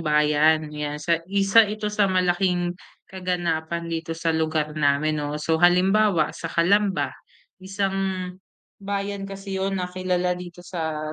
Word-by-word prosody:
Bayan, 150 0 +3
'yan 150 0 -4
sa 165 +3 0
Isa 200 +2 +4
ito 210 0 -3
sa 205 -1 +2
malaking 180 -1 +1 0.4
kaganapan 170 -3 -2
dito 165 -1 -4
sa 165 0 0
lugar 155 -1 0
namin, 150 +1 +1
'no. 145 0 -3
So, 160 +1 0
halimbawa 180 0 +4
sa 165 - -6
Calamba, 195 +4 +2 0.5
isang, 190 -1 -3 0.4
bayan 200 0 -3
kasi 195 -1 -5
'yon 195 0 -1
na 185 - -1
kilala 180 -1 0
dito 175 0 -9
sa 160 -4 -4
175 Hz, 135 wpm, -24 LUFS, 160-195 Hz, 0.5 s, Isa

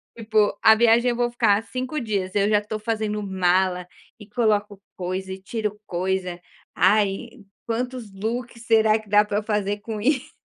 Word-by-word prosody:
Tipo, 215 -2 +1
a 220 -1 +7
viagem 235 +2 +4
eu 240 - 0
vou 240 0 0
ficar 220 -3 +2
5 255 +5 -4
dias, 200 -6 -3
eu 200 0 +3
já 210 -1 +4
estou 210 +1 -5
fazendo 215 -1 -2
mala 185 -1 +1 0.3
e 210 - -12
coloco 210 -3 0 0.2
coisa 190 +1 -4
e 190 - -9
tiro 210 +1 -4
coisa, 180 0 -2 0.4
"ai, 205 +2 +2 0.4
quantos 240 -2 -4
looks 230 +4 -4
será 220 -1 +4
que 215 -1 -16
dá 210 +1 +5
para 205 0 -2
eu - - -7
fazer 205 -1 -1
com 220 0 -5
isso?" 260 +4 0
210 Hz, 170 wpm, -23 LUFS, 195-230 Hz, 0.4 s, a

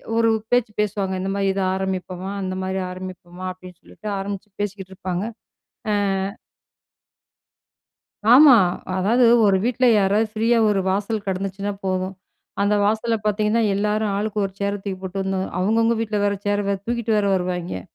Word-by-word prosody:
ஒரு 230 0 +3 0.2
பேச்சு 245 -3 +2
பேசுவாங்க 200 -2 -1
இந்த 190 - -2
மாரி 200 -1 0
இத 195 - -2
ஆரம்பிப்போமா! 190 0 -4
அந்த 185 -1 -3
மாரி 190 0 -2
ஆரம்பிப்போமா! 185 -1 -8
அப்டின்னு 185 -1 -13
சொல்லிட்டு 215 - -11
ஆரம்பிச்சு 200 +1 -5
பேசிக்கிட்டுருப்பாங்க. 190 -2 -4 0.7
ஆ. - - +2 2.4
ஆமா. 275 0 +9 0.4
அதாவது 230 +7 +3 0.2
ஒரு 195 -2 +4
வீட்ல 250 +1 +1
யாராவது 205 +3 +2
ஃப்ரீயா 230 +2 +2
ஒரு 200 -2 +2
வாசல் 205 +2 -1
கிடந்துச்சினா 195 +1 -2
போதும். 185 0 -1 0.5
அந்த 205 +1 +2
வாசல்ல 220 +2 +1
பார்த்தீங்கன்னா, 210 +2 +1
எல்லாரும் 210 +1 0
ஆளுக்கு 210 +1 -2
ஒரு 195 - -6
சேர 200 0 0
தூக்கி 195 -2 -4
போட்டு 190 +1 -4
வந்து 190 0 -1 0.2
அவங்கவங்க 225 +4 +2
வீட்ல 215 -2 -1
வேற 200 0 +1
சேர் 205 0 +1 0.2
தூக்கிட்டு 235 -2 0
வேற 205 - +1
வருவாங்கே. 180 - -3
200 Hz, 140 wpm, -22 LUFS, 190-215 Hz, 2.4 s, ஆமா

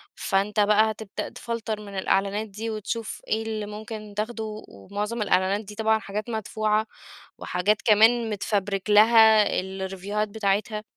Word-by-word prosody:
فأنت 200 +2 0
بقى 210 +1 +4
هتبدأ 215 -2 -6
تفلتَر 225 -2 -4
من 200 -2 -8
الإعلانات 200 +3 0
دي 215 +3 -6
وتشوف 220 +1 -4
إيه 220 +1 0
اللي 215 -1 -4
ممكن 215 0 -8
تاخده، 215 -1 -4
ومعظم 205 - -5
الإعلانات 195 +1 +2
دي 210 - -10
طبعًا 220 0 +2
حاجات 210 +2 -5
مدفوعة، 215 0 0 0.5
وحاجات 205 +4 0
كمان 225 +1 +4
متفَبرِك 200 -1 -2
لها 220 0 +7 0.2
الريفيوهات 190 +2 -3
بتاعتها، 210 +1 -1
210 Hz, 130 wpm, -25 LUFS, 200-220 Hz, 0.5 s, لها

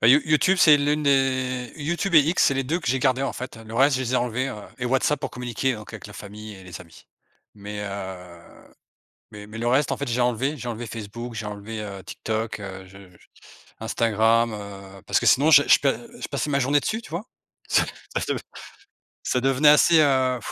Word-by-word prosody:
Bah, 115 - +5
You 140 +5 +7
YouTube, 155 +5 +3
c'est 155 -4 +7
l'une 145 +1 0
des 130 -3 +1
YouTube 170 +4 -2
et 155 - +9
X, 160 +5 +2
c'est 135 - +3
les 135 0 -1
2 160 +7 -1
que - - -4
j'ai 130 - +2
gardé, 130 0 +1
en 135 - -1
fait, 125 -2 -7
le 115 0 -10
reste, 135 +2 +4
je 130 - -2
les 125 -1 -3
ai - - +4
enlevés, 125 +2 -1
heu - - -5 0.2
et 125 - -4
WhatsApp 130 +4 +1
pour 135 - -4
communiquer, 125 +1 -2
donc 105 +1 -10
avec 105 - -9
la 105 - -12
famille 105 +1 -9
et 95 -1 -13
les 90 0 -9
amis 85 -3 -16 0.5
mais 105 0 -7
heu, 95 -3 -7 0.9
mais 105 -1 -10
mais 105 +2 -10
le 120 - -3
reste, 130 +3 +2
en - - -1
fait, 140 - -4
j'ai 120 +1 -1
enlevé. 125 +5 0
J'ai 125 - -6
enlevé 120 0 -5
Facebook, 115 +2 -7
j'ai 110 -1 -5
enlevé, 105 +2 -6
heu, 100 -2 -7
TikTok, 110 -1 -4
heu, 95 -1 -8
je 95 +1 -15
je 90 -1 -22 0.5
Instagram, 115 +1 +2
heu, 100 -2 -10
parce - - +3
que - - -2
sinon, 145 +5 +5
je 145 -2 +8
je - - +6
pa 140 - +2
heu, 235 - -10
je - - -4
passais 145 +1 -3
ma 140 0 +1
journée 140 +3 +3
dessus, 220 - -3
tu - - -13
vois? 170 +6 -4 0.4
Ça - - +4 0.4
ça - - -2
de - - -3 0.8
ça 125 - 0
devenait 135 +3 +3
assez, 160 +3 +6
heu 130 -3 +2
125 Hz, 230 wpm, -24 LUFS, 105-140 Hz, 0.9 s, et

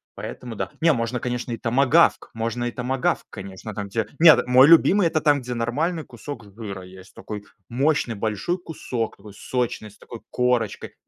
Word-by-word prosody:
поэтому, 120 -2 -7
да. - - -3
Не, 165 0 +5
можно, 120 -2 -1
конечно, 125 0 -3
и - - -4
томагавк, 135 +8 +3
можно 115 +2 -3
и 120 - -2
томагавк, 125 +2 -1
конечно, 100 +2 -8
там 100 -1 -5
те. 110 +2 -2
Нет, 165 -1 +7
мой 130 +2 +7
любимый- 170 +3 +6
это 155 -1 0
там, 145 -2 +3
где 125 0 -5
нормальный 150 +9 -1
кусок 145 -6 -9
жира 100 -3 -7
есть, 95 +1 -14
такой 105 -1 -8 0.2
мощный 130 -1 +1
большой 110 - -2
кусок, 130 -9 -4
такой 105 - -13
сочный, 115 0 -3
с 105 - -21
такой 120 - -11
корочкой. 125 -4 -1
120 Hz, 175 wpm, -23 LUFS, 110-140 Hz, 0.2 s, Нет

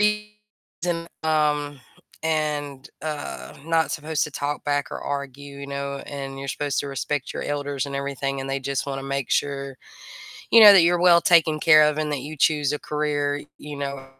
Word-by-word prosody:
and 210 -5 -3 0.2
um, 150 -3 0 0.4
and, 150 -2 -2
uh, 150 -2 -6
not 165 -2 +1
supposed 155 0 -2
to 150 - -7
talk 145 +1 -3
back 145 -1 -1
or - - -6
argue, 140 0 -5
you 140 - -7
know, 140 0 -4
and 135 -1 -6
you're 135 0 -6
supposed 145 +1 -2
to 145 - -5
respect 140 0 -3
your - - -4
elders 145 -1 -2
and 140 - -6
everything, 140 0 -3
and 135 - -5
they 135 0 -1
just 140 +1 -2
wanna 135 -1 -4
make 140 -1 -3
sure, 140 -2 -1 0.8
you 230 - +8
know, 210 -1 +12
that 185 -4 +7
you're 175 0 +3
well 175 -1 +7
taken 160 -3 +4
care 155 -1 +7
of 150 0 +2
and 155 -1 -1
that 140 -3 -2
you 155 +2 -7
choose 150 -1 +2
a - - -1
career, 145 -1 -1 0.2
you 150 0 -8
know, 140 -1 -5
145 Hz, 185 wpm, -24 LUFS, 140-155 Hz, 0.8 s, know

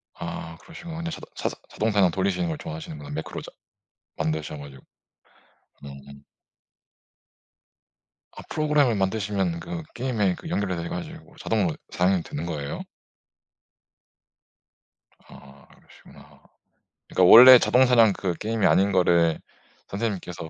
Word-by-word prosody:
아 80 0 -7
그러시구나. 165 - -10
근데 170 0 -4
자동 - - -9
사사 - - -3
자동 110 +1 -1
사냥 95 -4 +3
돌리시는 95 -2 -1
걸 80 - -4
좋아하시는구나, 75 -2 -8
매크로 80 +2 -6
자 - - -11 0.7
만드셔 80 -1 -3
가지고. 70 -2 -12 1.0
음. 70 0 -12 2.1
아 - - -7
프로그램을 150 -6 +1
만드시면 95 -3 -1
그 170 -1 -6
게임에 115 -7 -1
그 160 - -10
연결이 100 - -2
돼 85 - -5
가지고 165 - -8
자동으로 95 -8 -1
사냥이 90 -1 +1
되는 75 +4 -6
거예요? 75 -4 -5 2.5
아 70 +1 -16
그러시구나. - - -19 0.7
그러니까 90 -1 +3
원래 125 +2 +11
자동 130 +1 +3
사냥 115 -5 +4
그 90 -3 -2
게임이 110 -1 -2
아닌 100 +1 +3
거를 85 -3 +2 0.5
선생님께서 95 -6 -5
95 Hz, 300 characters per minute, -24 LUFS, 80-115 Hz, 2.5 s, 원래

